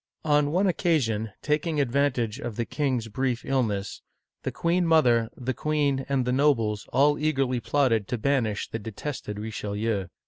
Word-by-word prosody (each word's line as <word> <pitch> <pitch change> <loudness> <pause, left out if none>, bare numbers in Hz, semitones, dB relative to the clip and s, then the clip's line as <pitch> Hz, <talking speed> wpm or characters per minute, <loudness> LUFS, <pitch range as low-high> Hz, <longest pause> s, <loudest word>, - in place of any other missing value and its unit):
On 150 -1 +3
one 185 +5 +2
occasion, 135 - +1
taking 150 +1 0
advantage 130 -3 0
of 120 -6 -5
the 115 - -1
king's 130 -6 -1
brief 125 +2 -2
ill 135 -1 +2
ness, 100 -4 -3 0.4
the - - -3
queen 175 +2 +1
mother, 125 -9 +4
the 130 +1 -2
queen, 145 -1 0
and 135 -3 +1
the 125 - 0
nobles, 115 -7 +1
all 145 +3 +3
eagerly 135 -5 +1
plotted 115 -3 +1
to 125 - -2
banish 115 -3 0
the 115 - -5
detested 110 0 -6
Richelieu. 105 -1 -3
130 Hz, 160 wpm, -26 LUFS, 110-145 Hz, 0.4 s, mother